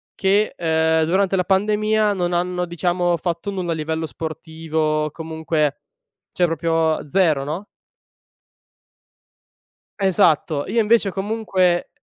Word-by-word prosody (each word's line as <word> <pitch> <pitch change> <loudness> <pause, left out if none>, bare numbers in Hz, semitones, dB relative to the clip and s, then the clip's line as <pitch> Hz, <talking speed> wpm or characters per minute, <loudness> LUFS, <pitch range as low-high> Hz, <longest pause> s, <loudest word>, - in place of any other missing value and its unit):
che, 200 +2 +2
ehm, 160 -1 +2
durante 190 +3 +1
la 180 - +1
pandemia 210 +2 +2
non 180 -2 -1
hanno, 180 +1 -1
diciamo, 175 +1 0
fatto 170 +4 -3
nulla 185 -3 -3
a - - -3
livello 160 +1 -3
sportivo 155 +1 -3
comunque 160 -2 -2 0.5
cioè 175 - +2
proprio 165 -1 0
0 160 -5 +2
no? 160 +8 -5 2.3
Esatto. 170 -6 +2
Io 235 - +1
invece 215 -2 +3
comunque, 195 -3 0
175 Hz, 110 wpm, -21 LUFS, 160-195 Hz, 2.3 s, invece